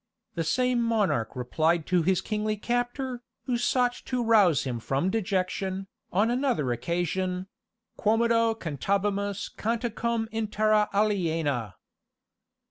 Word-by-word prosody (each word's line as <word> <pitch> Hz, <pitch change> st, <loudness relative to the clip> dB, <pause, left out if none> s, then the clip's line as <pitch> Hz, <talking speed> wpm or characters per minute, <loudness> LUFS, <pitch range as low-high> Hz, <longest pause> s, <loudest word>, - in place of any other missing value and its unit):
The 165 Hz, -, -1 dB
same 250 Hz, +8 st, +1 dB
monarch 210 Hz, -, +1 dB
replied 155 Hz, +6 st, +1 dB
to 180 Hz, -1 st, +2 dB
his 185 Hz, +2 st, +2 dB
kingly 215 Hz, 0 st, -2 dB
captor, 245 Hz, +3 st, -2 dB, 0.2 s
who 250 Hz, -, -1 dB
sought 245 Hz, +1 st, +2 dB
to 250 Hz, -2 st, -1 dB
rouse 205 Hz, -, +4 dB
him 125 Hz, -3 st, -3 dB
from 135 Hz, +10 st, 0 dB
dejection, 190 Hz, -2 st, -1 dB, 0.3 s
on 210 Hz, +6 st, +2 dB
another 245 Hz, -, +1 dB
occasion 180 Hz, +6 st, -1 dB, 0.5 s
"Quomodo 230 Hz, +1 st, +3 dB
cantabimus 200 Hz, -, -1 dB
canticum 230 Hz, 0 st, -1 dB
in 220 Hz, -1 st, -1 dB
terra 215 Hz, 0 st, +2 dB
aliena!" 165 Hz, -, 0 dB
205 Hz, 115 wpm, -27 LUFS, 175-230 Hz, 0.5 s, rouse